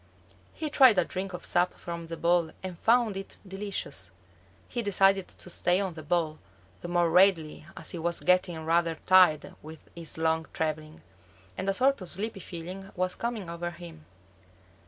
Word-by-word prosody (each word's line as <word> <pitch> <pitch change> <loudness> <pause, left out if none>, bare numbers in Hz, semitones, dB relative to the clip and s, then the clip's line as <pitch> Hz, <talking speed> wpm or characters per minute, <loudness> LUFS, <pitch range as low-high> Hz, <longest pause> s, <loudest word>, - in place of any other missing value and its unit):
He 310 -2 -4
tried 260 -8 +7
a 180 - +4
drink 190 +1 -4
of 180 - -6
sap 175 +1 +2
from 170 -1 -7
the 165 0 -6
ball 170 -1 +2
and 185 -2 -5
found 230 -3 +3
it 195 0 -7
delicious. 195 - -5 0.6
He 240 - -3
decided 195 -2 +3
to - - -7
stay 175 +2 +2
on 190 -3 -2
the 160 - -8
ball, 155 -1 -1 0.4
the - - -7
more 175 -1 +2
readily 170 -4 +3
as - - -3
he 175 - -5
was 170 +1 -1
getting 180 -3 +2
rather 165 0 +2
tired 180 -5 +5
with 155 +1 -12
his 165 -2 -5
long 160 0 +1
traveling, 155 - -3 0.5
and 195 - -2
a - - +2
sort 270 0 +2
of 180 - -8
sleepy 205 +2 -5
feeling 185 +2 -8
was 185 0 0
coming 230 -5 -4
over 170 +1 -4
him. 170 -2 -11
175 Hz, 175 wpm, -28 LUFS, 165-195 Hz, 0.6 s, tried